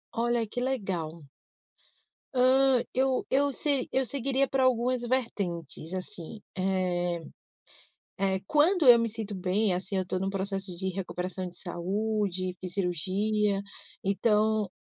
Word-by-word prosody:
Olha, 235 0 +1
que 245 +4 -4
legal! 185 - -2 1.1
Hã, 260 0 +5
eu 260 0 +2
eu 280 +1 +2
se 280 -1 0
eu 265 - +2
seguiria 275 +2 +1
para 265 0 +1
algumas 250 0 +2
vertentes 185 - -2
assim, 185 +2 -6 0.2
eh. 180 -2 0 0.9
É 195 -1 +1
quando 310 - +4
eu 245 -1 +11
me 230 0 +1
sinto 220 -2 -5
bem 190 +2 +1
assim, 190 +2 -3
eu 190 - +2
estou 185 0 -2
num 190 +1 -1
processo 195 -1 -3
de 190 +2 -2
recuperação 185 0 -4
de 175 - -15
saúde 185 +1 -2
e 185 - -3
cirurgia, 195 +3 0 0.4
então, 210 +1 +2
200 Hz, 130 wpm, -29 LUFS, 185-245 Hz, 1.1 s, eu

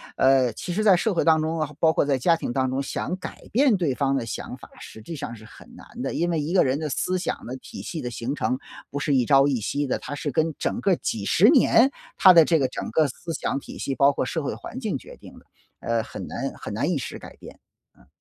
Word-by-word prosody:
呃， 130 -3 +3
其 175 - -6
实 215 +5 -1
在 195 -3 +7
社 205 +4 0
会 170 - 0
当 160 -1 +4
中 160 +1 -2
啊， 155 -2 -1
包 160 - +5
括 160 - +1
在 140 -2 +1
家 165 +6 +3
庭 120 - -4
当 130 0 +1
中， 130 +2 -1
想 140 - -3
改 185 - -8
变 255 0 +4
对 170 -8 0
方 135 +1 0
的 130 -4 -1
想 115 - -6
法， - - -14
实 110 - -11
际 160 +9 -7
上 120 - -6
是 110 - -14
很 125 - -15
难 245 0 -11
的。 - - -3
因 170 +1 0
为 165 -2 0
一 150 +4 -3
个 190 - +5
人 135 +2 0
的 155 - -3
思 180 +6 -1
想 180 - -4
的 125 +3 -6
体 - - -10
系 160 - -5
的 125 - -4
形 120 +3 -4
成 130 - -1 0.3
不 145 - -4
是 145 0 0
一 130 -3 +3
朝 135 +2 +5
一 140 - +1
夕 145 +7 -2
的， 130 - -1
它 145 - -6
是 145 0 -3
跟 160 +2 0
整 - - -2
个 195 -2 +2
几 110 -10 -3
十 195 - +5
年 265 -2 +5 0.3
他 190 - +8
的 165 -3 +7
这 165 - +3
个 135 -4 +1
整 - - -5
个 160 - +3
思 165 +6 -7
想 140 - -2
体 - - -11
系， 135 - -3
包 140 +1 +4
括 130 - -1
社 160 +5 -2
会 - - -2
环 255 - -8
境 220 -5 -2
决 - - -13
定 - - -14
的， - - -25 0.4
呃， - - 0
很 - - -8
难 - - -4
很 - - -7
难 - - -1
一 - - 0
时 - - -6
改 - - -12
变， - - -13 0.4
嗯。 - - -22
150 Hz, 295 characters per minute, -24 LUFS, 130-175 Hz, 0.4 s, 他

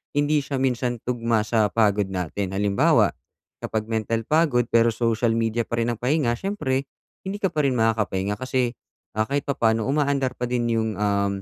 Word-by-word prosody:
hindi 145 +1 +2
siya 140 0 -4
minsan 125 -2 -1
tugma 115 -2 0
sa 110 0 +2
pagod 105 -2 +2
natin. 95 +1 -3
Halimbawa, 100 0 +3 0.5
kapag 110 0 -3
mental 115 +1 -1
pagod 150 -4 +2
pero 115 0 +5
social 115 0 +1
media 115 0 0
pa - - -2
rin 120 - 0
ang 115 - -5
pahinga, 130 -1 +1
siyempre 140 -9 -2 0.4
hindi 200 +2 -3
ka 190 - +3
pa 150 -2 0
rin 130 - 0
makakapahinga 105 -3 0
kasi, 130 -2 0 0.5
ah, 110 0 +1
kahit 140 0 -1
papaano 115 -5 +1
umaandar 140 -2 +1
pa 125 - -1
din 120 -1 -1
yung, 110 -1 +1
um, 100 -1 0
115 Hz, 175 wpm, -24 LUFS, 110-130 Hz, 0.5 s, pero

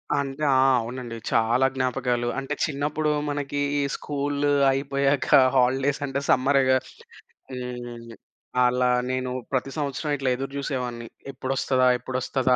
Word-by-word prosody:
అంటే 140 +1 -2
ఆ! - - +4 0.2
అవునండి. 120 0 -6 0.2
చాలా 115 +3 +3
జ్ఞాపకాలు. 125 -2 0
అంటే 135 +2 -4
చిన్నప్పుడు 150 +1 -1 0.2
మనకి 145 0 -3 0.4
స్కూలు 145 0 -1 0.2
అయిపోయాక 140 0 0 0.3
హాలిడేస్ 135 +3 +2
అంటే 135 0 -2
సమ్మరే‌గా! 130 0 +4 0.7
హ్మ్. 120 -2 -7 0.5
అలా 125 0 +2 0.2
నేను 130 0 -2 0.2
ప్రతి 135 0 -1
సంవత్సరం 145 0 -2
ఇట్లా 135 -2 -1
ఎదురుజూసేవాడిని. 130 -3 -4 0.2
ఎప్పుడొస్తదా? 130 0 0
ఎప్పుడొస్తదా? 130 +1 0
130 Hz, 105 wpm, -25 LUFS, 125-140 Hz, 0.7 s, ఆ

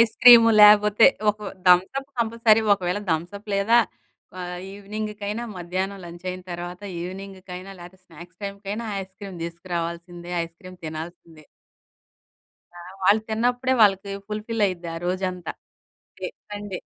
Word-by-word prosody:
Ice cream 230 +1 +8 0.2
లేకపోతే, 210 +1 +7 0.2
ఒక 210 - -10 0.3
Thums Up 190 +11 +3
compulsory. 225 -1 +3
ఒకవేళ 185 +1 -2
థమ్సప్ 180 +6 -3
లేదా 205 +4 +4 0.6
ఆహ్, 180 0 -5
ఈవినింగ్‌కైనా 210 +2 -5
మధ్యాహ్నం 185 +3 -3
లంచ్ 175 +1 -11
అయిన 185 0 -7
తర్వాత, 175 +1 -6 0.2
ఈవినింగ్‌కైనా 190 +1 -8
లేకపోతే, 180 +2 -12
స్నాక్స్ 175 +2 -14
టైమ్‌కైనా 200 +3 -5 0.2
ఐస్‌క్రీమ్ 190 0 -10
తీసుకురావాల్సిందే. 170 0 -5
ఐస్‌క్రీమ్ 180 +2 -13
తినాల్సిందే. 160 -1 -9 1.3
ఆ! - - -9 0.2
వాళ్ళు 205 +3 +5
తిన్నప్పుడే 245 +3 +1
వాళ్ళకి 195 -1 +3 0.2
ఫుల్‌ఫిల్ 215 +1 -1
అయిద్ది 175 -3 -4
ఆ - - -5
రోజంతా. 185 -1 -2 0.7
Day - - -3 0.2
Sunday. 205 -3 -5
190 Hz, 115 wpm, -24 LUFS, 175-210 Hz, 1.3 s, ఐస్‌క్రీమ్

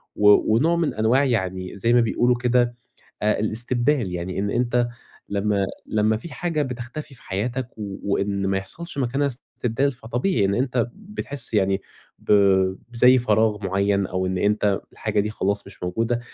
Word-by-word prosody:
و 105 +1 +5
ونوع 165 +8 +3
من 170 -2 0
أنواع 115 +6 +3
يعني 95 -7 -2
زي 115 +4 +1
ما 120 - +6
بيقولوا 120 +2 +2
كده 120 0 +2 0.5
آآ 105 0 +2
الاستبدال. 120 +1 0
يعني 90 +2 -3
إن 100 +1 -1
أنت 120 0 +1 0.4
لمّا 100 0 +1 0.2
لمّا 110 0 +2
في 150 +5 -9
حاجة 165 -4 -1
بتختفي 130 +3 -5
في 115 - -15
حياتك 120 +6 -2
و 100 -3 -5 0.2
وإن 100 -1 0
ما 95 0 +1
يحصلش 150 - -6
مكانها 135 +2 +1
استبدال، 130 +1 -2
فطبيعي 120 - 0
إن 100 +1 +1
أنت 125 -2 0
بتحسّ 200 - -5
يعني 95 -1 +2 0.4
ب - - -3 0.6
بزي 125 +2 +6
فراغ 110 -3 +1
مُعيّن، 100 +1 +1
أو 95 0 -2
إن 95 0 -1
أنت 105 0 +1
الحاجة 110 -1 -1
دي 105 - -2
خلاص 100 -1 -2
مش - - -12
موجودة. 115 +6 0
110 Hz, 160 wpm, -23 LUFS, 100-125 Hz, 0.6 s, ما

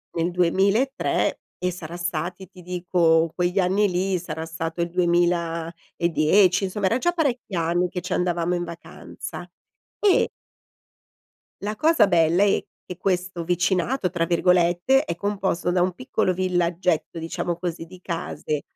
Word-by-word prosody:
nel 170 +1 0
2003 195 +9 +1 0.2
e 180 0 -1
sarà 170 -1 -8
stati 175 +2 -3
ti 185 0 -15
dico, 170 -2 +2
quegli 180 +2 -1
anni 195 +2 +3
lì 185 +1 0
sarà 160 -1 -5
stato 165 +1 -4
il 170 - -1
2010, 170 +1 +1
insomma, 195 +1 -2
era 230 +7 +2
già 350 +4 +1
parecchi 255 - -1
anni 170 +2 +1
che 180 - -4
ci 180 +1 -4
andavamo 175 -1 0
in 175 0 -1
vacanza 170 -1 -9 0.5
e 405 -3 +4 1.3
la 210 +1 -3
cosa 305 -5 +4
bella 170 +1 +3
è 205 - +2 0.2
che: 180 - -8
questo 180 -2 -1
"vicinato," 180 +5 0
tra 170 -1 -1
virgolette, 180 - +3
è 170 - -3
composto 195 -3 -1
da 180 0 +2
un 180 0 +1
piccolo 220 -5 -1
villaggetto, 175 -2 0
diciamo 165 +1 -3
così, 170 -2 -4
di 185 +1 -14
case 165 -4 -3
180 Hz, 140 wpm, -24 LUFS, 170-190 Hz, 1.3 s, e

